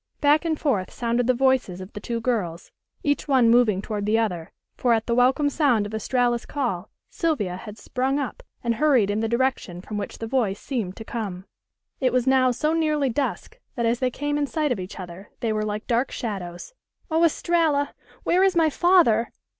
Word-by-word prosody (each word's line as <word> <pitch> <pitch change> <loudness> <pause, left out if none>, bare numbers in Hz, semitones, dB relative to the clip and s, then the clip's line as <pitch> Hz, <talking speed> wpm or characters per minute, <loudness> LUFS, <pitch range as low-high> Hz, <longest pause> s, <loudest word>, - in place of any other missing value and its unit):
Back 295 +2 +3
and 315 -2 0
forth 215 - 0
sounded 240 0 -1
the 255 - +3
voices 255 -8 +1
of 185 +1 -9
the - - -6
two 230 +2 -3
girls, 200 -9 -2 0.3
each 290 +1 0
one 255 -5 +4
moving 220 -5 +3
toward 210 -2 -3
the 220 +1 +3
other, 180 -8 -2 0.2
for 245 -2 +2
at 225 - -2
the 235 - 0
welcome 255 +4 +3
sound 275 -8 +2
of 205 - -7
Estralla's 240 +2 0
call 225 -10 -2 0.2
Sylvia 265 - -1
had 210 +3 -9
sprung 265 +4 -1
up 280 -3 -4 0.2
and 235 -1 +1
hurried 250 -6 +3
in 205 - -1
the 225 - 0
direction 235 -7 -1
from 205 +3 -5
which 200 - -6
the 225 - -5
voice 225 -5 0
seemed 220 -9 -3
to 220 - -8
come. 195 -6 -5 0.5
It 255 -2 +2
was 250 0 +1
now 260 -1 +4
so 305 +6 0
nearly 305 -4 +1
dusk 290 - -3 0.2
that 235 - -1
as 230 +1 +1
they 255 - +1
came 290 +3 -2
in 290 - 0
sight 305 -1 -1
of 235 - -1
each 185 +2 -7
other 185 +2 -9
they 225 -2 0
were 215 - -1
like 210 0 -3
dark 240 +3 +1
shadows. 190 - -5 0.4
"Oh, 325 +1 +3
Estralla! 320 -3 +2 0.3
Where 360 - +3
is 385 -1 +3
my 320 -2 +3
father?" 305 -11 +4
240 Hz, 200 wpm, -24 LUFS, 210-285 Hz, 0.5 s, one